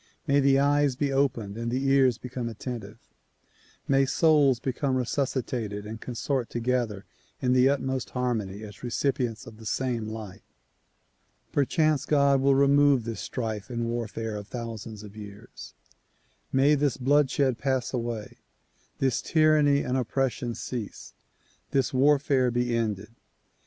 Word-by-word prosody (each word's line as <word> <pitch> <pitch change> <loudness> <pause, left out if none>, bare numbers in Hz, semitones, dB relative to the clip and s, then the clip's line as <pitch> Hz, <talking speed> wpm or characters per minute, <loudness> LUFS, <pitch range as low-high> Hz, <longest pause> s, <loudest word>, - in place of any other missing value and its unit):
May 140 -2 +3
the 135 -1 +4
eyes 145 -1 +3
be 140 +1 -1
opened 120 -6 0
and 115 0 -2
the 130 +3 -1
ears 135 -3 +4
become 125 -1 -5
attentive; 110 -2 -7 0.9
may 135 0 +3
souls 145 -5 +4
become 130 +1 -1
resuscitated 125 -5 -2
and 110 +1 -7
con 125 - -6
sort 130 -1 -1
together 120 -4 -1 0.3
in 125 -1 +1
the 130 +1 +5
utmost 130 -2 -1
harmony 110 -5 -2
as 105 -1 -11
recipients 125 -2 -1
of 110 - -12
the 110 - -13
same 120 -2 -1
light. 110 -4 -7 1.1
Perchance 150 +1 +1
God 140 -3 +3
will 135 0 +4
remove 140 -2 +4
this 115 0 -5
strife 110 -3 -4
and 120 -1 -2
warfare 115 -2 -3
of 105 -1 -8
thousands 115 -3 -7
of 105 0 -12
years. 100 -1 -11 0.8
]\Iay 140 +3 +4
this 145 -3 +1
bloodshed 135 -1 +2
pass 130 -2 -1
away, 115 -3 -4 0.6
this 135 -2 +1
tyranny 155 -3 +3
and 125 - -1
oppression 125 -1 -1
cease, 115 -5 -6 0.6
this 135 -1 0
warfare 135 -1 +3
be 120 0 0
ended. 110 -2 -2
125 Hz, 135 wpm, -27 LUFS, 115-140 Hz, 1.1 s, the